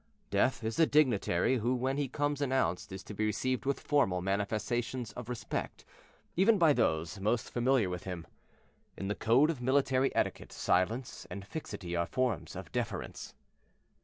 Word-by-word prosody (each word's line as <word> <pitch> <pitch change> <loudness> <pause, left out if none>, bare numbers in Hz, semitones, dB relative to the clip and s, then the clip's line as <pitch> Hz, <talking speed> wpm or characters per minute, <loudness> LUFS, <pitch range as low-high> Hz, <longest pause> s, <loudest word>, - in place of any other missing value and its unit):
Death 130 -2 +2
is 110 0 -2
a 165 - +6
dignitary 130 - +3
who 120 +4 +1
when 130 +2 -1
he 145 -1 0
comes 145 +1 -1
announced 130 -13 0
is 95 0 -7
to 105 - -8
be 110 - -2
received 125 +5 -1
with 140 - +1
formal 120 -12 +2
manifestations 110 +5 -1
of 125 -1 -8
respect, 125 - -4 0.5
even 205 +5 +5
by 165 -5 +5
those 80 - 0
most 110 +4 0
familiar 120 -3 +2
with 90 0 -4
him. 90 -3 -5 0.7
In 95 - -3
the - - +1
code 125 +9 +4
of 140 -7 -7
military 130 +1 +2
etiquette - - -1
silence 110 +8 0
and 100 -1 -7
fixity 100 - -5
are 85 0 0
forms 125 -8 -1
of - - -8
deference. - - -4
120 Hz, 160 wpm, -32 LUFS, 100-135 Hz, 0.7 s, a